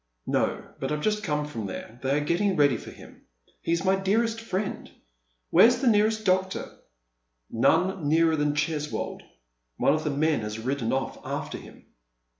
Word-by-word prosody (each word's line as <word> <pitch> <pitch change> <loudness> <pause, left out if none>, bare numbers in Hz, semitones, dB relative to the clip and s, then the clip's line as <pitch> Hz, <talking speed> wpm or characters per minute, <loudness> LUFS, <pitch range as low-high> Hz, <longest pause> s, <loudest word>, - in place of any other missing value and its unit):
" - - -50
No. - - -2
but 135 - -3
I've 150 0 -1
just 210 0 0
come 150 -5 -1
from 115 -8 -5
there, 110 +5 -8
they 135 +2 +1
are 145 - -1
getting 185 +5 +1
ready 145 -4 +4
for - - -8
him. - - -14 0.4
He's 170 +2 -1
my 190 +1 +4
dearest 225 +4 0
friend. 200 -2 -3 0.6
"U'here's 240 +2 +7
the 270 - -2
nearest 215 -1 +3
doctor?" 190 0 +2
■' - - -14 0.7
None 165 +7 +2
nearer 160 +1 +4
than 145 -1 0
Cheswold. 150 0 -2 0.6
One 140 - +3
of 155 0 -1
the 150 - -1
men 150 +1 +1
has 105 0 -4
lidden 130 -3 -1
off 135 0 -2
after - - -4
him." - - -15
160 Hz, 175 wpm, -26 LUFS, 145-195 Hz, 0.7 s, U'here's